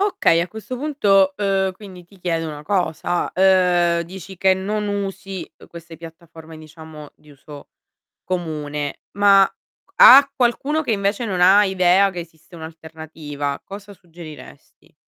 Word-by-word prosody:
Okay 390 - +2
a 175 - -3
questo 220 +3 -8
punto, 205 -9 +2
uhm, 195 -2 0
quindi 185 -2 -13
ti 195 +3 -22
chiedo 165 -2 -3
una 150 -1 -9
cosa, 175 -1 -2
uhm, 180 -2 +2
dici 190 +2 -11
che 190 +1 +3
non 205 +3 -3
usi 195 -2 -6 0.2
queste 170 -1 -12
piattaforme 165 -1 -13
diciamo 155 -1 -13
di 150 - -22
uso 145 0 -14 0.6
comune, 150 -5 -5 0.2
ma 200 -1 +5 0.4
q - - -33
a 275 +2 +9
qualcuno 270 +5 0
che 300 - -3
invece 200 +3 -2
non 190 -4 -3
ha 195 +3 +6
idea 190 +1 +2
che 180 -2 -7
esiste 165 +1 -16
un'alternativa, 160 -3 -8
cosa 200 +1 -11
suggeriresti? 170 -4 -15
180 Hz, 140 wpm, -20 LUFS, 160-200 Hz, 0.6 s, a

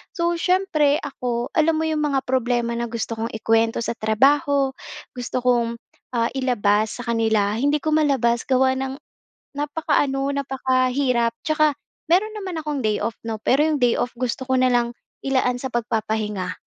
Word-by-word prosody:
So, 340 -1 0
siyempre 330 -6 +2
ako, 245 -4 -3
alam 320 +1 +3
mo 320 - 0
'yong 315 -1 0
mga 280 -3 +1
problema 240 -2 0
na 235 - -1
gusto 230 0 -4
kong 230 +1 -2
ikuwento 225 +1 +1
sa - - -2
trabaho, 275 +5 +2 0.4
gusto 250 0 -3
kong, 235 -2 +2 0.4
ah, 230 0 +1
ilabas 220 -4 +1
sa - - -7
kanila, 220 -3 +2
hindi 285 +5 +2
ko 310 - 0
malabas 265 -6 +2
gawa 260 0 +3
ng 265 0 -3 0.6
napakaano, 285 -2 0
napakahirap. 255 -3 +1
Tsaka 310 -2 +3 0.4
meron 390 +6 +3
naman 375 -4 -5
akong 300 -2 -2
day-off 215 +1 -1
'no, 225 - -2
pero 285 +4 +3
'yong 305 -4 0
day-off, 245 0 +1
gusto 255 +1 -2
ko 260 - +3
nalang 245 -2 +2 0.3
ilaan 260 -2 +1
sa 265 - -3
pagpapahinga. 215 -5 -2
255 Hz, 150 wpm, -22 LUFS, 235-285 Hz, 0.6 s, alam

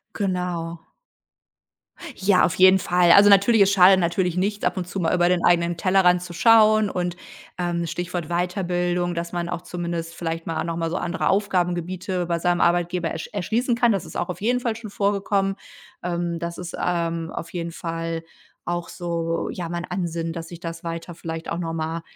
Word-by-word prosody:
Genau. 180 -4 -3 1.3
Ja, 190 -1 +3
auf 180 - +2
jeden 185 +1 +6
Fall. 175 -1 +3
Also 205 +1 +8
natürlich, 200 +2 +5
es 195 0 +5
schadet 190 0 +6
natürlich 175 0 0
nicht, 205 +2 -1
ab - - 0
und 180 -1 -3
zu 190 +2 -4
mal 165 - +1
über 175 -1 +3
den 180 -1 +1
eigenen 170 -1 +3
Tellerrand 180 -1 +3
zu 175 -1 -8
schauen. 215 0 +5
Und, 175 -1 -2 0.4
ähm, 175 -1 -1
Stichwort 175 -1 -4
Weiterbildung, 175 0 -1
dass 170 0 -4
man 170 0 -2
auch 175 -1 -4
zumindest 170 -2 -5
vielleicht 165 -1 -4
mal 160 -1 -2
noch 165 0 -3
mal 165 -1 -1
so 175 - -2
andere 175 +2 -1
Aufgabengebiete 185 -1 -1
bei 170 -1 -1
seinem 175 +1 +1
Arbeitgeber 175 0 +1
ersch 160 - -6
erschließen 225 +6 0
kann. 240 0 +3
Das 195 -4 -1
ist 160 - -11
auch 175 - -2
auf 180 - -6
jeden 245 +4 +1
Fall 235 -3 -2
schon 225 -1 -8
vorgekommen. 200 -1 0 0.5
Ähm, 170 -1 -2
das 170 +1 -5
ist, 175 -1 -6
ähm, 165 -1 -1
auf 170 - -7
jeden 170 -1 -4
Fall 165 0 -4 0.4
auch 175 0 -3
so, 165 -1 -3
ja, 175 -2 -5
mein 175 +1 -4
Ansinnen, 170 -3 -3
dass 165 -1 -7
ich 170 - -9
das 165 0 -7
weiter 165 +1 -6
vielleicht 165 -1 -6
auch 170 - -2
noch 165 -2 -3
mal, 160 +1 -3
175 Hz, 190 wpm, -23 LUFS, 170-185 Hz, 1.3 s, Also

